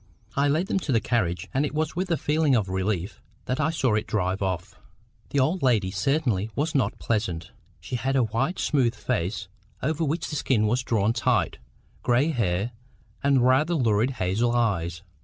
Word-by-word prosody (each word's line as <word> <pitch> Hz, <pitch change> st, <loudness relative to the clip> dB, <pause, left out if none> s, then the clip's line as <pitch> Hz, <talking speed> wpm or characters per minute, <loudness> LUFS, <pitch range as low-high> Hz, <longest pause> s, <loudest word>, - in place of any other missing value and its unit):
I 140 Hz, +1 st, +3 dB
led 155 Hz, +6 st, +2 dB
them 195 Hz, -, 0 dB
to 160 Hz, -, -3 dB
the 115 Hz, -, +4 dB
carriage, 105 Hz, -7 st, -1 dB
and 135 Hz, -, +2 dB
it 150 Hz, -, -3 dB
was 155 Hz, 0 st, -1 dB
with 185 Hz, +2 st, -2 dB
a 165 Hz, -, +2 dB
feeling 150 Hz, -2 st, +2 dB
of 105 Hz, -5 st, +1 dB
relief 95 Hz, 0 st, -2 dB, 0.2 s
that 125 Hz, -, -2 dB
I 150 Hz, +1 st, +2 dB
saw 135 Hz, -8 st, +1 dB
it 105 Hz, 0 st, 0 dB
drive 95 Hz, -2 st, -1 dB
off. 95 Hz, -3 st, -2 dB, 0.6 s
The 140 Hz, -, +1 dB
old 160 Hz, +7 st, +1 dB
lady 110 Hz, -8 st, +2 dB
certainly 110 Hz, 0 st, 0 dB
was 155 Hz, +3 st, -1 dB
not 125 Hz, -7 st, +1 dB
pleasant. 95 Hz, -8 st, -2 dB, 0.3 s
She 125 Hz, -, -4 dB
had 135 Hz, +3 st, -1 dB
a 130 Hz, -, +4 dB
white 125 Hz, -, -1 dB
smooth 125 Hz, -5 st, +1 dB
face 95 Hz, 0 st, -2 dB, 0.4 s
over 155 Hz, +4 st, 0 dB
which 160 Hz, +3 st, -1 dB
the -, -, -3 dB
skin 120 Hz, -6 st, +2 dB
was 120 Hz, +4 st, +1 dB
drawn 110 Hz, -2 st, +1 dB
tight, -, -, +1 dB, 0.4 s
gray 125 Hz, +5 st, +2 dB
hair, 105 Hz, -, 0 dB, 0.5 s
and 140 Hz, -3 st, +3 dB
rather 150 Hz, +7 st, +3 dB
lurid 115 Hz, -4 st, +2 dB
hazel 105 Hz, +6 st, +1 dB
eyes. 85 Hz, -7 st, 0 dB
120 Hz, 185 wpm, -26 LUFS, 100-145 Hz, 0.6 s, the